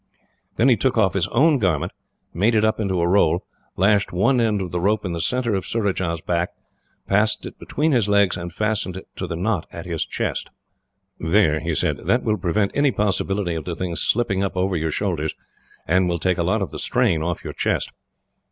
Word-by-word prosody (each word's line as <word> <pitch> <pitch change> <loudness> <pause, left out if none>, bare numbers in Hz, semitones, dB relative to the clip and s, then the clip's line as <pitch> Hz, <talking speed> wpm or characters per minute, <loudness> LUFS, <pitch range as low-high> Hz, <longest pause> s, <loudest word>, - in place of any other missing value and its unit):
Then 120 - +3
he 125 - +6
took 125 +3 0
off 100 -5 +3
his 95 -3 +1
own 145 +4 +3
garment, 90 -9 0 0.4
made 105 +7 +2
it 110 0 +4
up 110 - +1
into 95 -4 0
a 85 - +2
roll, 90 -2 +3 0.3
lashed 100 +2 +3
one 120 +8 +2
end 110 -2 +2
to 95 -2 -2
the 90 0 -3
rope 105 +2 +1
in 90 - -2
the 85 - -2
centre 125 +4 0
of 95 -2 -1
Surajah's 95 -7 -1
back, 85 +1 -1 0.5
passed 105 +2 +1
it - - -9
between 155 +2 0
his 115 -7 +2
legs 100 -2 +3
and 85 0 -6
fastened 105 -1 -1
it 95 - -10
to - - -3
the 85 - -4
knot 95 0 -1
at 85 - -8
his 85 -3 -2
chest. - - -3 0.7
"There," 80 -2 +3
he 85 -1 -2
said; - - 0
"that 125 - +2
will 110 -2 +1
prevent 100 +3 0
any 145 0 +3
possibility 100 -4 0
of 80 -2 -4
the 85 - -3
thing 90 -1 -3
slipping 100 -3 +1
up 95 -1 -3
over 95 0 +1
your 80 -1 -1
shoulders, 80 -3 -2 0.5
and 90 +2 +2
will 85 - 0
take 90 +1 0
a - - +2
lot 100 +4 +1
of - - -5
the - - -7
strain 115 -11 +1
off 85 +1 -3
your - - -6
chest." - - -1
95 Hz, 215 wpm, -22 LUFS, 85-110 Hz, 0.7 s, he